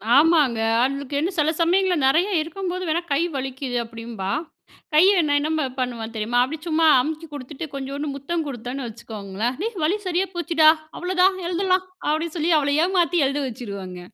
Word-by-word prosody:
ஆமாங்க. 290 Hz, -6 st, +4 dB, 0.2 s
அவளுக்கு 275 Hz, +2 st, -1 dB
என்ன 325 Hz, +5 st, 0 dB
செல 305 Hz, 0 st, +3 dB
சமயங்கள்ல 365 Hz, +2 st, +3 dB
நெறைய 335 Hz, +8 st, +3 dB
இருக்கும்போது 365 Hz, +3 st, -4 dB
வேணா 335 Hz, +2 st, +1 dB
கை 295 Hz, -, +2 dB
வலிக்குது 265 Hz, -1 st, -3 dB
அப்டின்பா. 230 Hz, -4 st, -6 dB, 0.6 s
கை 305 Hz, +3 st, +7 dB, 0.2 s
நான் 290 Hz, 0 st, +3 dB
என்ன 310 Hz, -1 st, 0 dB
பண்ணுவன் 235 Hz, -3 st, -3 dB
தெரியுமா? 225 Hz, +3 st, 0 dB
அப்டி 310 Hz, +4 st, -5 dB
சும்மா 320 Hz, 0 st, +3 dB
அமுக்கி 315 Hz, +4 st, -4 dB
கொடுத்துட்டு, 290 Hz, +3 st, -6 dB
கொஞ்சோண்டு 275 Hz, +2 st, -4 dB
முத்தம் 315 Hz, +4 st, -3 dB
கொடுத்தேன்னு 250 Hz, 0 st, -5 dB
வச்சுக்கோங்களேன். 220 Hz, +1 st, -5 dB
"டேய், 440 Hz, -1 st, -3 dB
வலி 345 Hz, +7 st, +2 dB
சரியா 365 Hz, +2 st, 0 dB
போச்சுடா, 330 Hz, -2 st, +4 dB, 0.3 s
அவ்ளோதான் 370 Hz, +1 st, +2 dB
எழுதலாம்." 370 Hz, +1 st, +1 dB, 0.2 s
அப்டின்னு 315 Hz, +2 st, -1 dB
சொல்லி 325 Hz, +2 st, +1 dB
அவள 285 Hz, 0 st, 0 dB
ஏமாத்தி 350 Hz, -1 st, +2 dB
எழுத 280 Hz, +1 st, -1 dB
வச்சுருவங்க. 200 Hz, -6 st, -7 dB
295 Hz, 155 wpm, -23 LUFS, 250-340 Hz, 0.6 s, கை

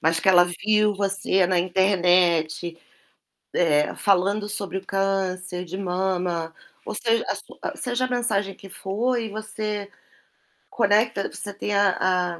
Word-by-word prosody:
mas 165 Hz, +1 st, +2 dB
que -, -, +1 dB
ela 175 Hz, -1 st, +7 dB
viu 210 Hz, +4 st, +1 dB
você 195 Hz, -1 st, +1 dB
na 185 Hz, 0 st, +2 dB
internet, 175 Hz, -3 st, +2 dB, 0.9 s
eh, 150 Hz, -1 st, +2 dB
falando 200 Hz, +2 st, +2 dB
sobre 200 Hz, -2 st, -3 dB
o 190 Hz, -, -11 dB
câncer 185 Hz, -2 st, -1 dB
de 180 Hz, +2 st, -7 dB
mama, 180 Hz, -3 st, -2 dB, 0.3 s
ou -, -, -5 dB
seja, 230 Hz, +1 st, +1 dB
a -, -, 0 dB
sua -, -, -7 dB
seja 250 Hz, 0 st, -1 dB
a -, -, -1 dB
mensagem 210 Hz, -6 st, 0 dB
que 195 Hz, -, -13 dB
for 210 Hz, +7 st, -1 dB
e 225 Hz, -, -4 dB
você 215 Hz, -1 st, -4 dB, 0.8 s
conecta 210 Hz, -1 st, +2 dB
você 205 Hz, -, -6 dB
tem 205 Hz, +1 st, -3 dB
a 185 Hz, -3 st, +1 dB
195 Hz, 140 wpm, -24 LUFS, 180-210 Hz, 0.9 s, ela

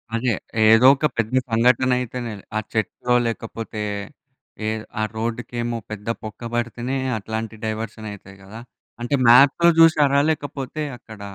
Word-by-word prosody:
అదే! 115 Hz, 0 st, +1 dB, 0.4 s
ఏదో 115 Hz, +3 st, +7 dB
ఒక 150 Hz, -, -1 dB
పెద్ద 115 Hz, +2 st, -1 dB, 0.2 s
సంఘటన 125 Hz, +3 st, +3 dB
అయితేనే 120 Hz, -1 st, -5 dB, 0.3 s
ఆ -, -, +2 dB
చెట్టుల్లో 120 Hz, +3 st, 0 dB
లేకపోతే 115 Hz, -1 st, -5 dB, 0.9 s
ఏ -, -, +1 dB, 0.3 s
ఆ -, -, +1 dB
రోడ్డుకేమో 120 Hz, +1 st, -3 dB
పెద్ద 105 Hz, 0 st, -7 dB, 0.2 s
బొక్క 110 Hz, +2 st, -8 dB
పడితేనే 120 Hz, +2 st, -2 dB, 0.2 s
అట్లాంటి 110 Hz, +1 st, -5 dB
డైవర్షన్ 110 Hz, 0 st, -5 dB
అయితాయి 95 Hz, -1 st, -12 dB
కదా! 110 Hz, +4 st, -10 dB, 0.4 s
అంటే 120 Hz, +4 st, 0 dB
మ్యాప్‌లో 140 Hz, +7 st, +6 dB
చూసారా? 145 Hz, -3 st, +5 dB
లేకపోతే 145 Hz, 0 st, -4 dB, 0.2 s
అక్కడ 110 Hz, -2 st, -13 dB
115 Hz, 125 wpm, -22 LUFS, 110-130 Hz, 0.9 s, ఏదో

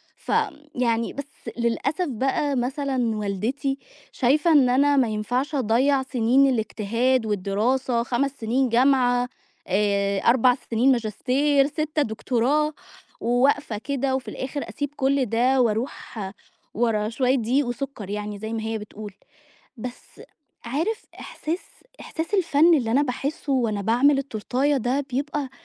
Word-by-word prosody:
ف -, -, -7 dB, 0.4 s
يعني 235 Hz, -2 st, 0 dB
بس 280 Hz, 0 st, -8 dB
للأسف 270 Hz, +8 st, 0 dB
بقى 270 Hz, +3 st, 0 dB
مثلًا 255 Hz, -2 st, -1 dB
والدتي 225 Hz, +7 st, -2 dB, 0.3 s
شايفة 295 Hz, +6 st, +2 dB
إن 280 Hz, -5 st, +5 dB
أنا 280 Hz, +3 st, +3 dB
ما 255 Hz, -3 st, +4 dB
ينفعش 245 Hz, +7 st, -2 dB
أضيّع 265 Hz, +2 st, +2 dB
سِنين 255 Hz, +2 st, +3 dB
الاجتهاد 230 Hz, +2 st, 0 dB
والدراسة، 220 Hz, +5 st, 0 dB
5 260 Hz, +3 st, 0 dB
سِنين 245 Hz, +4 st, +1 dB
جامعة، 245 Hz, 0 st, +3 dB, 0.4 s
آآ 200 Hz, 0 st, +1 dB
4 250 Hz, +2 st, +4 dB
سِنين 245 Hz, +4 st, +3 dB
ماجستير، 265 Hz, +5 st, +2 dB
6 305 Hz, +1 st, -1 dB
دكتوراه، 270 Hz, +5 st, 0 dB, 0.5 s
وواقفة 245 Hz, -1 st, +1 dB
كده 270 Hz, +2 st, -1 dB
وفي 265 Hz, -, -4 dB
الآخِر 275 Hz, +2 st, -5 dB
أسيب 290 Hz, -1 st, -3 dB
كل 275 Hz, -1 st, +1 dB
ده 250 Hz, +4 st, +2 dB
وأروح 230 Hz, 0 st, -2 dB, 0.5 s
ورا 215 Hz, -2 st, +1 dB
شوية 255 Hz, +2 st, +1 dB
دقيق 255 Hz, +3 st, +1 dB
وسُكّر 245 Hz, -5 st, -5 dB
يعني 210 Hz, 0 st, -4 dB
زي 220 Hz, +2 st, -5 dB
ما 225 Hz, -, -2 dB
هي 225 Hz, 0 st, -2 dB
بتقول. 210 Hz, -1 st, -9 dB, 0.6 s
بس 245 Hz, +2 st, -9 dB, 0.4 s
عارف 325 Hz, -, -2 dB, 0.2 s
إحساس 330 Hz, +4 st, -4 dB, 0.4 s
إحساس 325 Hz, +5 st, -5 dB
الفَن 335 Hz, -3 st, +4 dB
اللي 230 Hz, -4 st, -1 dB
أنا 270 Hz, +5 st, +4 dB
باحسّه 280 Hz, +2 st, -3 dB
وأنا 225 Hz, -6 st, 0 dB
باعمل 250 Hz, +7 st, +3 dB
التورتاية 275 Hz, +2 st, 0 dB
ده 260 Hz, +4 st, -1 dB
بيبقى 280 Hz, +1 st, -2 dB
255 Hz, 130 wpm, -24 LUFS, 225-280 Hz, 0.6 s, إن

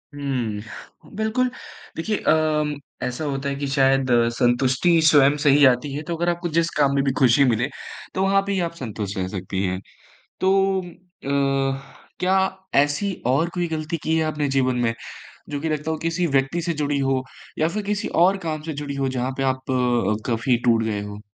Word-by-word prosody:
हुँ। 120 Hz, -7 st, -5 dB
बिल्कुल। 220 Hz, +4 st, 0 dB, 0.5 s
देखिए 205 Hz, +6 st, -1 dB
अम, 155 Hz, -1 st, +1 dB, 0.3 s
ऐसा 125 Hz, +5 st, -3 dB
होता 140 Hz, -1 st, -2 dB
है 140 Hz, -, -2 dB
कि 140 Hz, 0 st, -3 dB
शायद 135 Hz, -1 st, +2 dB, 0.2 s
संतुष्टि 130 Hz, +7 st, +2 dB
स्वयं 145 Hz, -2 st, +6 dB
से 145 Hz, -, +5 dB
ही 145 Hz, +1 st, +6 dB
आती 130 Hz, +2 st, +2 dB
है, 145 Hz, -, -3 dB
तो 170 Hz, +2 st, -3 dB
अगर 175 Hz, +1 st, 0 dB
आपको 175 Hz, 0 st, -2 dB
जिस 165 Hz, +1 st, +1 dB
काम 140 Hz, -2 st, +3 dB
में 140 Hz, -, +2 dB
भी 135 Hz, -, +1 dB
खुशी 130 Hz, +1 st, +5 dB
मिले, 120 Hz, +1 st, +1 dB, 0.5 s
तो 190 Hz, -, -1 dB
वहाँ 195 Hz, 0 st, +3 dB
पे -, -, -1 dB
ही 195 Hz, -, 0 dB
आप -, -, -18 dB
संतुष्ट 105 Hz, -, -5 dB
रह 95 Hz, -, -1 dB
सकती 95 Hz, 0 st, -4 dB
हैं। 95 Hz, 0 st, -2 dB, 0.6 s
तो 195 Hz, 0 st, +3 dB
अ, 140 Hz, -7 st, -2 dB, 0.4 s
क्या 185 Hz, +1 st, +3 dB, 0.4 s
ऐसी 145 Hz, +8 st, +2 dB
और 140 Hz, +7 st, +2 dB
कोई 175 Hz, -1 st, 0 dB
गलती 160 Hz, +1 st, -3 dB
की 160 Hz, +1 st, +1 dB
है 160 Hz, -, +1 dB
आपने 150 Hz, -2 st, -1 dB
जीवन 130 Hz, -2 st, +1 dB
में, 120 Hz, -2 st, +1 dB, 0.6 s
जो 145 Hz, -1 st, -4 dB
कि 160 Hz, -, -2 dB
लगता 155 Hz, +1 st, -2 dB
हो 160 Hz, -, 0 dB
किसी 165 Hz, +2 st, -1 dB
व्यक्ति 135 Hz, +3 st, 0 dB
से 170 Hz, +1 st, -1 dB
जुड़ी 145 Hz, 0 st, 0 dB
हो 135 Hz, -1 st, +1 dB, 0.4 s
या 155 Hz, +1 st, +2 dB
फिर 210 Hz, +4 st, -3 dB
किसी 205 Hz, +1 st, -2 dB, 0.2 s
और 190 Hz, +2 st, +4 dB
काम 155 Hz, -1 st, -3 dB
से 160 Hz, +1 st, -5 dB
जुड़ी 145 Hz, 0 st, -5 dB
हो, 135 Hz, -1 st, 0 dB
जहाँ 130 Hz, 0 st, -2 dB
पे -, -, 0 dB
आप 130 Hz, +1 st, -9 dB
अ, 120 Hz, -5 st, +1 dB
काफ़ी 120 Hz, +2 st, +2 dB
टूट 115 Hz, -2 st, +4 dB
गए 105 Hz, -2 st, -2 dB
हो? 105 Hz, 0 st, -8 dB
140 Hz, 195 wpm, -23 LUFS, 130-165 Hz, 0.6 s, स्वयं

